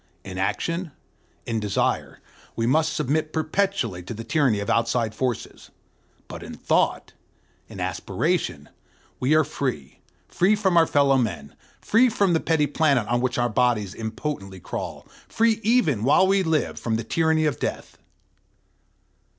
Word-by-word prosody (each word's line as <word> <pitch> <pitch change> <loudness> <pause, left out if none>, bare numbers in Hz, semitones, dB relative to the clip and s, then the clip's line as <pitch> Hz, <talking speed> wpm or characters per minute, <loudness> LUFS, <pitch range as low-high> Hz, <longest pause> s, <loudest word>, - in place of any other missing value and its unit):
In 95 0 -7
action, 155 - -2 0.5
in 115 -1 -1
desire, 105 -2 -1 0.3
we 115 - -1
must 155 +6 +2
submit 155 +3 -1
perpetually 160 - -1
to 90 +6 -7
the 115 - -6
tyranny 135 -7 +1
of 100 - -4
outside 115 -1 +1
forces; 125 0 -4 0.6
but - - -8
in - - -8
thought, - - 0 0.6
in - - -10
aspiration, - - -2 0.5
we 135 +5 +2
are 155 - +5
free, 125 - -4 0.3
free 195 +5 +2
from 195 -4 +1
our 165 -1 +5
fellowmen, 130 - +1 0.3
free 245 +4 +4
from 200 -5 +1
the 165 - +3
petty 160 -2 +1
planet 140 -5 +1
on 120 +1 +1
which 125 -1 -1
our 120 0 +2
bodies 110 -4 +1
impotently 110 -3 -5
crawl, - - -6 0.2
free 225 -1 +2
even, 205 - +2
while 145 +9 +5
we 195 +1 +3
live, 160 -4 0
from 115 -2 -1
the 115 - -2
tyranny 160 +5 +1
of 150 - -1
death. - - -5
140 Hz, 145 wpm, -24 LUFS, 115-160 Hz, 0.6 s, are